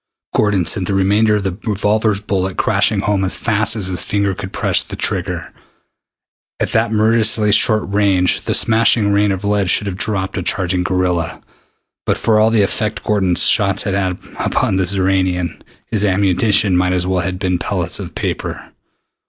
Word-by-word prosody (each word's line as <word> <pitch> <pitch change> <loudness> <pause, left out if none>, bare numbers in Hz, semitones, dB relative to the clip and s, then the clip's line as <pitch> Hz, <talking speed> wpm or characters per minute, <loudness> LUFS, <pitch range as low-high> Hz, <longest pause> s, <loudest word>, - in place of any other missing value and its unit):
Gordon 105 -4 +1
sent 90 +2 +1
the 100 - -1
remainder 105 +3 +2
of 105 - -2
the 95 -2 -3
revolver's 105 0 0
bullets 95 -2 -2
crashing - - +1
home 100 -1 0
as 95 - 0
fast 110 -1 +1
as 105 -4 -2
his 90 -1 -1
finger 100 -1 -1
could 95 0 -7
press - - +1
the - - -8
trigger. 90 -2 -3 1.1
At - - -2
that - - +1
murderously 110 -1 +2
short 110 0 +3
range 100 -2 +1
the - - 0
smashing 110 -2 +3
rain 100 0 +2
of 95 +1 -4
lead 100 -2 0
should 100 - +2
have 95 -2 -4
dropped 95 -2 -2
a - - -3
charging 90 0 -1
gorilla. 90 -2 -1 0.7
But - - +1
for 110 -1 +2
all 110 +1 +4
the 115 -2 +3
effect 105 +1 -2
Gordon's 95 -4 +1
shots 100 -2 +3
had 100 - -2 0.5
upon 95 - 0
the 95 -2 0
Xoranian, 95 -2 -1 0.2
his 105 -2 -2
ammunition 100 0 +2
might 90 0 +1
as 90 -1 0
well 95 0 0
have 90 +1 -3
been 90 -2 -1
pellets - - -2
of - - -8
paper. - - -4
100 Hz, 175 wpm, -17 LUFS, 95-105 Hz, 1.1 s, all